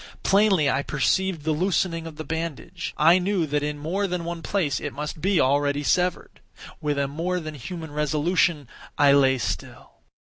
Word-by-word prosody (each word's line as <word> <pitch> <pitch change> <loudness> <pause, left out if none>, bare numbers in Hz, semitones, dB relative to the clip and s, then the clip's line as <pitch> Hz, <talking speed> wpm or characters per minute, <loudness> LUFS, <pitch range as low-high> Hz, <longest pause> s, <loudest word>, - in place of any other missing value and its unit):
Plainly 195 -6 +4
I 140 0 +1
perceived 160 +4 0
the 160 - 0
loosening 165 0 0
of 160 - -9
the 155 - -6
bandage. 165 +2 -5
I 165 +4 +6
knew 185 -2 0
that 145 0 -1
in 150 0 -3
more 180 +7 -1
than 180 -2 -3
one 170 0 -4
place 165 -7 -1
it - - -5
must 150 +2 -5
be 190 0 +2
already 145 +2 +2
severed. 180 +4 0 0.4
With 150 -1 -1
a 140 0 +1
more 170 +6 -2
than 155 -2 -6
human 160 +3 -7
resolution 150 0 +1 0.3
I 145 -1 +5
lay 135 -2 +4
still. - - -6
160 Hz, 175 wpm, -24 LUFS, 145-180 Hz, 0.4 s, I